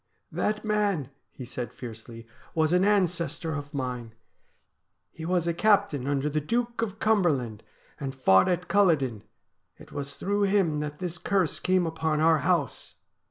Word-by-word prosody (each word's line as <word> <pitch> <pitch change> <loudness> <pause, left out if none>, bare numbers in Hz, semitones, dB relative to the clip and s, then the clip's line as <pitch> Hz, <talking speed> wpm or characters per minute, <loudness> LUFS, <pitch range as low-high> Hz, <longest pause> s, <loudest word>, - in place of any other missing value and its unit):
' - - -49
That 210 +1 -1
man,' 205 - 0 0.2
he 130 - -9
said 120 -1 -5
fiercely, 115 -1 -9
' - - -26
was 160 +1 +2
an 180 +1 +4
ancestor 170 -5 +1
of 145 -1 -5
mine. 125 -5 -4 1.0
He 160 - -8
was 175 -1 +1
a 170 - +1
captain 165 -9 +2
under 140 0 0
the 150 +1 0
Duke 235 +8 -1
of 210 -3 -3
Cumberland, 150 - +1 0.4
and 135 -1 -4
fought 95 -8 +5
at 180 0 -1
Culloden. 155 - +2 0.6
It - - -15
was 140 0 -5
through 205 +1 0
him 190 -7 +2
that 150 0 -4
this 175 -1 -4
curse 190 -2 0
came 185 -1 +2
upon 160 -1 -1
our 160 0 +4
house.' 165 -7 -1
160 Hz, 160 wpm, -27 LUFS, 140-185 Hz, 1.0 s, fought